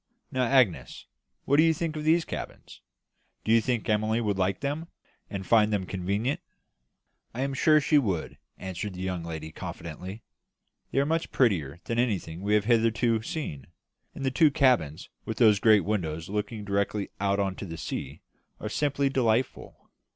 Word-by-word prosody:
"Now, 130 -2 +1
Agnes, 125 -7 +2 0.4
what 140 - +3
do 155 - +7
you 165 -1 +4
think 160 -1 -3
of 155 - -4
these 160 +2 +3
cabins? - - -8 0.6
Do 110 - +1
you 115 0 +6
think 120 -1 -1
Emily 110 +1 +1
would 105 -4 -1
like 95 0 0
them, 145 +4 -3 0.4
and 95 -2 -5
find 110 0 +4
them 100 -3 0
convenient?" 100 +8 -1 1.0
"I 125 - -2
am 135 0 -1
sure 155 +3 +5
she 145 +1 +4
would," 95 - -2 0.2
answered 95 +1 -5
the 90 - -6
young 90 -2 -3
lady, 80 -1 -6
confidently. 90 +8 -7 0.7
"They - - -5
are 140 - +4
much 165 +2 -1
prettier 85 - +1
than 115 0 -2
anything 95 -8 -1
we 105 +2 +2
have 105 -1 +2
hitherto 115 0 +2
seen; 110 - -5 0.5
and 135 - -5
the 130 - +1
two 160 +5 +4
large 145 - +3
cabins, 85 - +2
with 110 - -5
those 110 -4 +5
great 105 -3 +5
windows 85 -5 -2
looking 105 +1 -3
directly 100 0 -1
out 100 0 +1
on 95 -1 0
to - - -6
the 80 -1 -7
sea, - - -5 0.4
are - - -4
simply 140 -1 0
delightful." 125 -2 -1
110 Hz, 175 wpm, -27 LUFS, 95-130 Hz, 1.0 s, do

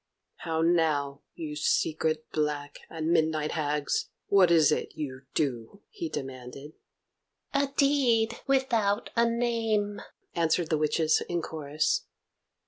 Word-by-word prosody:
"How 160 -1 -1
now, 155 -4 +1
you 155 -2 -5
secret, 155 +1 0
black, 150 -1 -2
and 160 0 -2
midnight 155 -2 +1
hags? 150 - -1 0.2
What 195 -3 +6
is 165 -3 +5
it - - -2
you 130 -3 -6
do?" 135 - -2
he 355 -7 -5
demanded. 135 - -7 0.8
"A 280 0 +2
deed 240 -5 +3
without 235 -7 +1
a 235 0 +4
name," 225 -3 0 0.3
answered 165 0 +1
the 155 - +2
witches 155 +1 +2
in 175 -1 -1
chorus. 150 -1 -1
160 Hz, 120 wpm, -28 LUFS, 150-215 Hz, 0.8 s, What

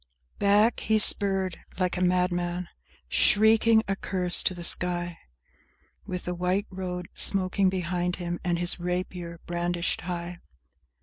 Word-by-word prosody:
IX 60 0 -38
Back, 205 +3 +3
he 220 - +1
spurred 195 -4 +4 0.2
like 180 -1 -1
a 180 - -3
madman, 180 -1 -1 0.4
shrieking 220 +1 +3
a 195 - -1
curse 180 -2 0
to 185 - -1
the 175 - -8
sky, 175 0 +2 0.9
With 180 -1 -5
the 180 - -4
white 180 +3 -1
road 180 -2 -6
smoking 190 0 +3
behind 180 -1 -2
him 175 -1 -5
and 175 -1 -1
his 175 +1 -1
rapier 180 -1 -5
brandished 175 0 -2
high! 175 -1 -6
180 Hz, 135 wpm, -26 LUFS, 175-190 Hz, 0.9 s, spurred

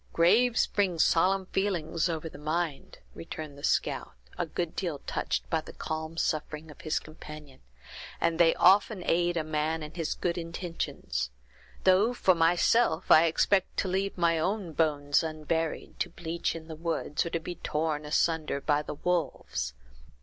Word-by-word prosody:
"Graves 225 +8 +4
bring 190 -4 0
solemn 185 +4 +3
feelings 175 -4 -1
over 160 -1 -3
the 150 - -10
mind," 155 0 -3 0.2
returned 145 - -7
the 140 - -13
scout, - - 0 0.2
a - - -2
good 165 +1 -3
deal 170 -6 -2
touched - - -1
at 160 -1 0
the - - -9
calm 160 +1 -5
suffering 155 -1 -2
of - - -14
his 155 - -1
companion; 150 -3 -9 0.6
"and 165 -1 +1
they 165 -1 +5
often 195 +1 +4
aid 175 0 +2
a 160 - 0
man 155 +1 -1
in 150 +1 -8
his 165 -3 -2
good 175 0 -1
intentions; 170 - -4 0.5
though, 195 +6 +4
for 190 - +4
myself, 170 +3 +3
I 160 - +8
expect 190 +4 +2
to - - +1
leave 195 +2 -1
my 170 -2 +2
own 185 0 -1
bones 145 -3 +2
unburied, 160 0 -3
to - - 0
bleach 170 0 -3
in 160 -1 -8
the 160 - -7
woods, 160 -2 -1
or - - -3
to 165 - -1
be 170 +2 -6
torn 155 -2 -2
asunder 155 -1 0
by 145 +1 +1
the 150 - -6
wolves. 145 - -2
165 Hz, 165 wpm, -29 LUFS, 155-175 Hz, 0.6 s, I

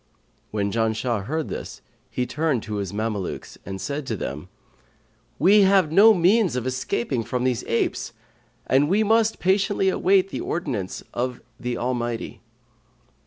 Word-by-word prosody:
When 100 -1 -1
Janshah 110 -1 0
heard 155 +5 -2
this, - - -7 0.3
he 125 - -2
turned 150 -4 -1
to 105 -1 -4
his 100 -3 -3
Mamelukes 105 -2 -4
and 95 0 -5
said 140 +5 -4
to 110 - -2
them, 75 +2 -6 0.9
'We 200 +8 +6
have 190 -5 +4
no 205 +7 +8
means 185 - +3
of 125 -1 -2
escaping 130 -1 -1
from 125 +3 -2
these 125 -1 0
apes, 115 - -1 0.5
and 140 +3 +3
we 205 +4 +3
must 220 +1 +3
patiently 195 +1 +2
await 190 0 +3
the - - -4
ordinance 130 - -3
of 125 0 -2 0.2
the 125 -1 -3
Almighty.' 120 -2 -3
130 Hz, 145 wpm, -24 LUFS, 115-185 Hz, 0.9 s, no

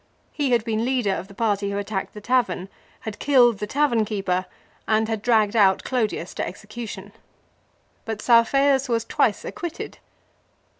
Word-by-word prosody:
He 285 -3 -1
had 235 -2 +2
been 225 -1 -1
leader 245 -5 +1
of 190 - -5
the 200 - -15
party 205 -2 0
who 200 - -3
attacked 200 0 -4
the 210 - -8
tavern, 205 -6 0 0.3
had 220 -2 -7
killed 245 -6 +4
the 210 - -3
tavern 265 -3 +2
keeper, 195 -3 -2 0.4
and 220 0 +2
had 220 -2 -2
dragged 220 -2 +2
out 195 -3 +4
Clodius 220 -8 -2
to - - -3
execution. 205 0 -8 0.9
But 220 -2 -4
Saufeius 265 +4 +3
was 230 -1 0
twice - - +1
acquitted. 345 -2 -6
220 Hz, 155 wpm, -23 LUFS, 200-245 Hz, 0.9 s, killed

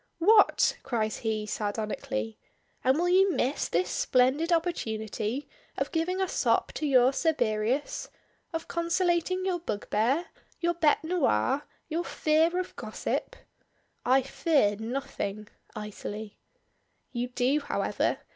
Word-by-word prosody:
"What!" 415 +5 +5
cries 220 -4 -1
he, 220 -2 -2
sardonically; 205 - -3 0.4
"and 260 +2 +3
will 350 +2 +1
you 380 +2 +5
miss 270 +1 0
this 180 +2 0
splendid 265 +7 +2
opportunity 235 - -1 0.3
of - - -1
giving 350 +3 0
a 380 - +1
sop - - +1
to 305 - -2
your 255 -2 +5
Cerberus? 245 -4 0 0.4
Of 325 -1 -4
conciliating 345 +1 0
your 365 -2 0
bugbear? 250 +2 0 0.3
your 345 0 +1
bête 315 -2 +2
noire? 295 - +1 0.2
your 330 +3 -1
fear 320 +2 +2
of 365 - -5
gossip?" - - -3 0.7
"I 260 +2 +4
fear 275 -6 +2
nothing" 220 -3 -4 0.3
icily. 210 0 -7 0.7
"You 245 0 -2
do, 250 +3 +1
however. 285 - -1
270 Hz, 120 wpm, -28 LUFS, 220-335 Hz, 0.7 s, What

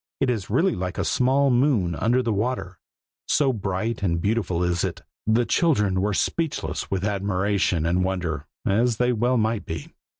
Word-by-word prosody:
It 135 -2 +2
is 110 -6 -3
really 160 - +2
like 90 0 -4
a - - -1
small 135 +2 +2
moon 120 - +2
under 120 +9 +1
the 115 -2 0
water, 100 -6 -2 0.5
so 135 -3 +2
bright 105 +1 -2
and 85 -4 0
beautiful 95 -3 0
is 85 -1 0
it. - - -3 0.2
The 115 +2 +3
children 105 - +2
were 105 0 0
speechless 165 - -2
with 95 0 -1
admiration 100 -4 0
and 90 +2 +1
wonder, 85 -5 -2 0.2
as 115 +3 +2
they 125 +1 +2
well 120 +3 +1
might 110 -1 0
be. 80 -3 -6
105 Hz, 170 wpm, -24 LUFS, 90-125 Hz, 0.5 s, The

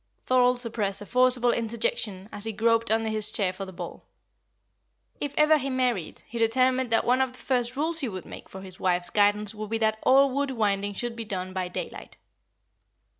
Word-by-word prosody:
Thorold 250 -1 +3
suppressed 215 -5 -3
a - - -8
forcible 250 +1 +6
interjection 230 - -3
as 205 - -3
he 225 - -2
groped 230 +2 +1
under 225 0 +1
his 215 -1 +3
chair 190 -4 0
for 195 +1 -7
the 190 - -10
ball. 175 -2 -9 1.2
If 290 -1 -4
ever 305 0 +4
he 275 0 -4
married, 250 -9 -2
he 235 - -7
determined 255 +2 +2
that 225 - +1
one 250 +2 +2
of 260 -1 -1
the - - -16
first 250 -2 -2
rules 320 +4 -1
he 270 -6 -2
would 185 -3 -7
make - - -11
for 190 - -10
his 185 -1 -10
wife's 175 -1 0
guidance 205 0 +2
would 215 -1 -7
be 225 - -1
that 220 -1 0
all 275 +1 +4
wool 280 +2 -1
winding 205 -5 -1
should 240 +2 -4
be 230 - -5
done 185 -2 -5
by 185 -1 -3
daylight. 180 - -8
225 Hz, 200 wpm, -26 LUFS, 200-255 Hz, 1.2 s, forcible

